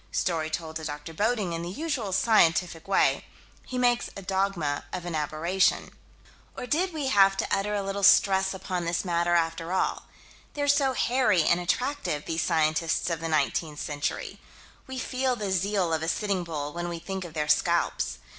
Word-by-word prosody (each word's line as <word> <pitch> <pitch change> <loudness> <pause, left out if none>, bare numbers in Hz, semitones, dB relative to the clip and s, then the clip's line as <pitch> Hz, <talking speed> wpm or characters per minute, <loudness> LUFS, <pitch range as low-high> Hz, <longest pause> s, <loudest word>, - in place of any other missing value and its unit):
Story 160 -3 -1
told 160 0 -4
to 160 - -8
Dr. 150 +1 -6
Bodding: 210 -1 0
in 165 - -3
the 170 - -5
usual 255 - -3
scientific 180 -5 +2
way, 195 - +2 0.4
he 255 - -4
makes 245 -1 +2
a 195 - -7
dogma 190 -7 -1
of 180 -1 -5
an 175 - -4
aberration. 155 +5 0 0.7
Or - - -5
we - - -6
did 350 +3 0
have 195 -3 +5
to - - -1
utter 210 +1 -1
a 200 - -1
little 195 +1 -3
stress 190 -1 +5
upon 185 -2 -3
this 170 +3 -1
matter, 175 0 +1
after 165 0 0
all. 190 - -1 0.5
They're 290 -1 -1
so 280 -2 +3
hairy 240 -9 +2
and 170 +3 +3
attractive, 180 - -1
these 165 0 -1
scientists 160 +2 +1
of 165 - -1
the 165 - -3
19th 155 0 0
century. 145 -1 -4 0.5
We 260 0 -6
feel 255 0 -1
the 205 -4 -3
zeal 190 -2 0
of 160 - 0
a 160 - -3
Sitting 195 0 0
Bull 150 -3 -5
when 175 0 -4
we 170 - -4
think 190 +3 -5
of 170 -2 -10
their 150 -1 -1
scalps. 170 +3 +1
180 Hz, 185 wpm, -27 LUFS, 165-205 Hz, 0.7 s, have